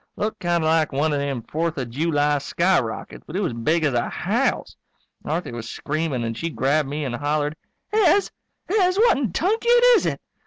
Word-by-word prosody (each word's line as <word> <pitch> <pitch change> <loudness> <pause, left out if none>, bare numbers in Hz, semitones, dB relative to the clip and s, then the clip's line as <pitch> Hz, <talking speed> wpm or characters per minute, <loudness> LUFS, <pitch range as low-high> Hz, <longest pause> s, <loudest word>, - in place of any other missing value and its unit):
Looked 215 +1 -3
kind 175 -2 0
of - - +1
like 160 -1 +2
one 145 +3 0
of 145 - 0
them 140 -4 -3
Fourth 165 +4 -2
of 125 -4 -4
July 145 +1 +1
skyrockets, 170 -5 -1
but 160 - -8
it - - 0
was 175 -10 -1
big 155 +9 0
as 145 -4 +1
a 120 0 0
house. - - -1 0.5
Marthy 160 0 -3
was 115 -1 -7
screaming 150 -4 -2
and 115 0 -3
she 165 +8 -3
grabbed 145 -1 0
me 150 +1 -3
and 125 - -3
hollered, 145 +2 -1 0.4
"Hez! 405 -1 +3 0.4
Hez, 370 -1 +2
what 450 - +4
in 245 -9 -1
tunket 435 - 0 0.2
is 455 - +3
it?" - - -2
155 Hz, 195 wpm, -23 LUFS, 140-180 Hz, 0.5 s, what